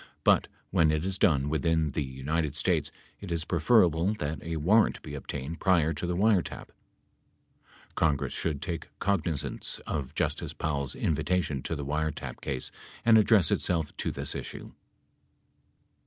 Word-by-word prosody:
But - - +4 0.2
when 85 -5 +4
it 75 +2 0
is 95 0 -1
done 70 -6 +3
within 80 0 +1
the 75 - -2
United 70 +3 -2
States 75 -4 +1 0.3
it 100 -4 -8
is 80 -2 0
preferable 85 0 +3
that 75 -4 -4
a 85 0 -4
warrant 100 +9 +3
be 75 - -8
obtained 70 +2 -5
prior 85 -4 +3
to 90 - -3
the 90 - -1
wiretap. 100 -1 +1 1.2
Congress 75 -4 +1
should 75 -3 -2
take 85 -1 -4
cognizance 85 -7 -1
of 70 -4 -4
Justice - - -1
Powell's 70 -4 -2
invitation 80 -3 0
in - - -1
the 70 - -4
wiretap 75 +2 -3
case 65 -2 -2 0.3
and 115 -1 +7
address 105 -6 +4
itself 80 -4 0
to - - -1
this - - -3
issue. - - -7
80 Hz, 145 wpm, -29 LUFS, 75-90 Hz, 1.2 s, and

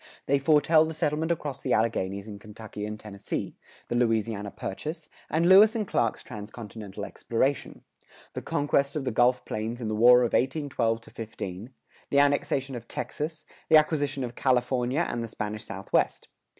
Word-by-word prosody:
They 140 0 +2
foretell 155 +2 +4
the 160 0 -5
settlement 155 +2 0
across 145 -5 -3
the 130 - 0
Alleghanies 100 -2 0
in 100 -2 -8
Kentucky 105 0 -8
and 105 0 -6
Tennessee; 105 -2 -5 0.3
the - - -3
Louisiana 115 -3 0
Purchase, 150 - -6 0.2
and 165 +2 +2
Lewis 205 +5 +8
and 215 -3 -1
Clark's 115 -10 0
transcontinental 105 -1 -8
exploration; 130 +4 -2 0.5
the - - -4
conquest 140 0 0
of 150 - -1
the 130 - -1
Gulf 125 +2 +3
Plains 110 +3 -4
in 115 -3 -3
the 110 - -1
War 125 +3 +7
of 120 - 0
1812 130 -5 0
15; 105 -2 -7 0.4
the 140 - +1
annexation 140 -1 +1
of 120 -1 -7
Texas; 155 +1 -5 0.2
the 160 - +8
acquisition 145 -3 +1
of 120 -1 -5
California 125 +4 +1
and 120 -1 -3
the - - -4
Spanish 105 0 -5
Southwest. 95 0 -1
125 Hz, 160 wpm, -27 LUFS, 110-145 Hz, 0.5 s, Lewis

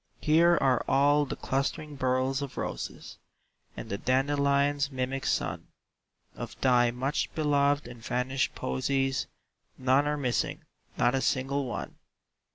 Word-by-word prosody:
"Here 170 +3 +5
are 130 -3 +2
all 145 +1 +3
the - - -4
clustering 145 +2 -2
burls 130 +1 0
of 140 -2 -6
roses, - - -5 0.6
And - - -6
the 100 - -4
dandelion's 140 +1 +2
mimic 130 0 -3
sun; - - -1 0.7
Of - - -8
thy 125 -2 +4
much 130 +4 -2
beloved 145 -3 +2
and 120 -2 -11
vanished 125 +3 -1
posies 135 - -1 0.5
None 130 +3 +3
are 150 0 0
missing, 125 -4 -1 0.3
not 120 - +3
a 135 - +1
single 135 +2 0
one!" 120 - -5
135 Hz, 130 wpm, -28 LUFS, 130-145 Hz, 0.7 s, Here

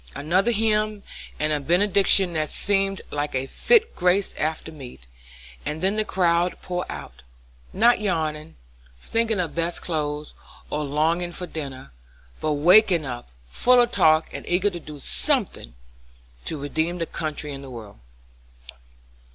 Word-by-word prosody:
Another 185 +9 +1
hymn, 215 -2 0 0.4
and 155 0 +1
a 150 - 0
benediction 190 +3 +3
that 155 -1 -1
seemed 195 -1 +1
like 145 -1 -2
a 130 0 0
fit 455 - +2
grace 180 +2 +2
after 160 +1 -3
meat, 135 - -11 0.6
and 155 +3 -4
then 195 +2 +2
the 215 - +1
crowd 175 -3 +1
poured 180 -1 -3
out; - - -8 0.5
not 235 +2 +4
yawning, 155 - -2 0.4
thinking 225 - 0
of 170 -4 -2
best 170 +1 -2
clothes, 150 -2 -3 0.4
or 150 - -1
longing 160 +5 0
for 180 - -4
dinner, 135 - -7 0.5
but 155 -1 0
waked 180 +8 +6
up, 130 - -3 0.2
full 250 - +4
of 240 -1 +3
talk, 155 -4 +4
and - - -6
eager 190 +3 +2
to 175 - -6
do 150 -2 -10
something 200 - -1 0.7
to 160 - -2
redeem 160 +5 -1
the 165 - -1
country 155 -2 -4
and 135 0 -8
the 135 - -9
world. 110 - -10
170 Hz, 145 wpm, -24 LUFS, 150-195 Hz, 0.7 s, waked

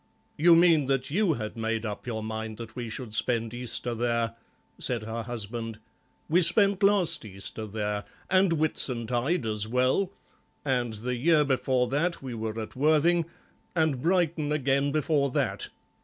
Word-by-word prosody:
"You 170 +2 +6
mean 165 -5 +5
that 135 -1 0
you 190 0 +2
had 110 -5 -5
made 115 0 -2
up 105 +3 -6
your 110 -2 -3
mind 110 0 -5
that 115 -1 -9
we 120 -2 -5
should 110 0 -6
spend 115 0 0
Easter 120 0 -3
there," 115 -1 -1 0.5
said 120 -3 -1
her 110 +1 -4
husband; 115 -1 -5 0.5
"we 175 +4 +3
spent 195 +3 +6
last 200 -3 +2
Easter 105 +1 -6
there, 105 -1 -3 0.2
and 185 -2 +3
Whitsuntide 130 -1 +1
as 105 -1 -1
well, 130 - +1 0.5
and 125 -4 0
the 125 +4 -3
year 150 +3 +3
before 130 -2 +1
that 165 +6 0
we 130 -2 -7
were 110 0 -4
at 110 - -7
Worthing, 155 +4 +3 0.5
and 160 -6 +1
Brighton 165 -3 +1
again 140 -1 +1
before 150 -1 +1
that. - - -1
125 Hz, 155 wpm, -27 LUFS, 115-155 Hz, 0.5 s, You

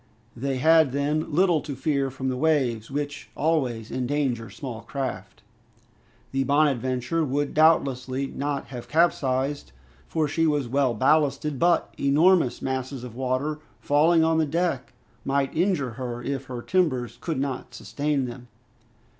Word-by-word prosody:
They 135 +2 -2
had 160 -1 +4
then 150 +3 -1
little 170 0 +3
to 145 -1 -6
fear 135 0 0
from 130 0 -3
the 130 - -1
waves, 130 -6 +1
which 145 +1 -4
always 130 -8 0
endanger 130 -3 -1
small 125 -5 -7
craft. 105 -9 -5 0.9
The 135 0 +1
"Bonadventure" 135 +1 +1
would 145 0 -1
doubtlessly 140 -4 +2
not 140 +1 -3
have 120 -2 -8
capsized, 140 - +1 0.3
for 155 -2 0
she 165 +2 +1
was 145 -4 0
well 130 -1 +1
ballasted, 145 +2 +2
but 170 -1 +2
enormous 150 +1 +3
masses 130 -1 -3
of 125 -3 -8
water 130 +4 -1 0.2
falling 160 +3 +3
on 160 0 +2
the 155 - +2
deck 165 -3 -1 0.3
might 135 0 0
injure 170 - +1
her 120 0 -5
if 135 +1 -3
her 125 -2 -6
timbers 130 - 0
could 160 -5 -2
not 135 -2 -4
sustain 145 -2 -1
them. 125 0 -8
140 Hz, 140 wpm, -25 LUFS, 130-155 Hz, 0.9 s, had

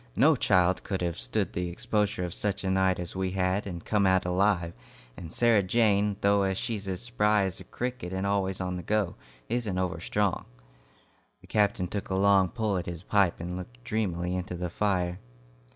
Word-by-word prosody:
No - - +5
child 90 0 +3
could 95 -3 -2
have 85 -5 -2
stood - - -1
the 90 0 -2
exposure 105 +2 -1
of 90 -1 -3
such 100 -1 -2
a 95 - 0
night 95 -1 +2
as 90 0 -6
we 95 -1 -1
had 95 +2 0
and 85 -3 -6
come 105 -3 +2
out 95 -1 +3
alive; 90 -2 +1 0.4
and 80 +3 -9
Sarah 115 -1 +4
Jane, 100 0 +2
though 100 -1 +3
she's 100 0 -3
as 95 +4 -3
spry 105 -4 +2
as 95 -1 -3
a - - -9
cricket 125 -7 -4
and 95 +1 -2
always 95 -1 0
on 90 -1 -2
the - - -5
go, 100 0 0 0.3
isn't 115 -5 -1
over 90 -2 -1
strong." 100 +2 0 1.0
The - - -16
captain 100 -3 +1
took 100 +2 -4
a 95 - 0
long 95 -1 +4
pull 110 -2 -1
at 90 - -4
his 85 0 -6
pipe 100 -3 +2
and 90 +1 -4
looked - - -9
dreamily 90 - -1
into 90 -1 -4
the 90 -1 -4
fire. 90 -3 0
95 Hz, 195 wpm, -28 LUFS, 90-105 Hz, 1.0 s, No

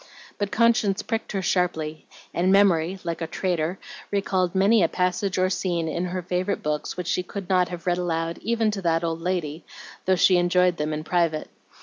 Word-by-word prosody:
But 205 -1 -1
conscience 225 -4 +2
pricked 225 -1 -3
her 195 -1 -1
sharply, 160 -4 -1 0.3
and 180 +2 +2
memory, 190 -3 +4
like 170 0 -4
a 165 - -2
traitor, 175 -1 -1 0.3
recalled 190 -2 0
many 200 +3 +4
a 170 - +4
passage 180 +2 -1
or 185 0 +3
scene 175 -3 -1
in 170 +3 -2
her 180 0 -3
favorite 185 +3 -2
books 150 +2 -2
which 180 - -3
she 180 - 0
could 190 +1 -7
not 180 -1 +3
have 175 -2 -7
read 175 0 +1
aloud 165 -1 -2
even 225 0 +1
to 205 -2 -4
that 165 -1 +1
old 165 0 -2
lady, 170 -3 -2 0.4
though 190 - +4
she 185 0 +5
enjoyed 180 0 +3
them 150 +1 -2
in 155 0 -3
private. 165 -2 0
180 Hz, 195 wpm, -24 LUFS, 165-190 Hz, 0.4 s, she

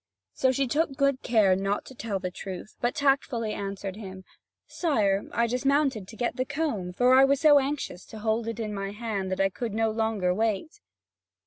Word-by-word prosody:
So 260 - +2
she 275 +1 +1
took 280 +1 0
good 275 -1 +2
care 210 -5 +4
not 195 +2 -1
to - - -11
tell 225 -5 -3
the 185 -1 -4
truth, 190 +3 -8
but 240 +4 0
tactfully 270 -6 +1
answered 195 -1 -5
him: 190 -3 -9 0.4
"Sire, 210 - 0
I 235 - +2
dismounted 260 -3 +1
to 220 - -11
get 240 +1 -2
the 255 - +1
comb; 270 - -2
for 245 +7 +3
I 265 +1 +7
was 275 0 +3
so 295 -2 +7
anxious 270 -9 -3
to 220 - -11
hold 220 +1 -1
it 230 -1 -4
in 215 -2 -3
my 195 0 -4
hand 210 -4 -3
that 185 - -2
I 195 0 +3
could 225 +2 -5
not 220 -1 +1
longer 220 -5 +1
wait." 205 -4 -1
225 Hz, 200 wpm, -27 LUFS, 195-265 Hz, 0.4 s, I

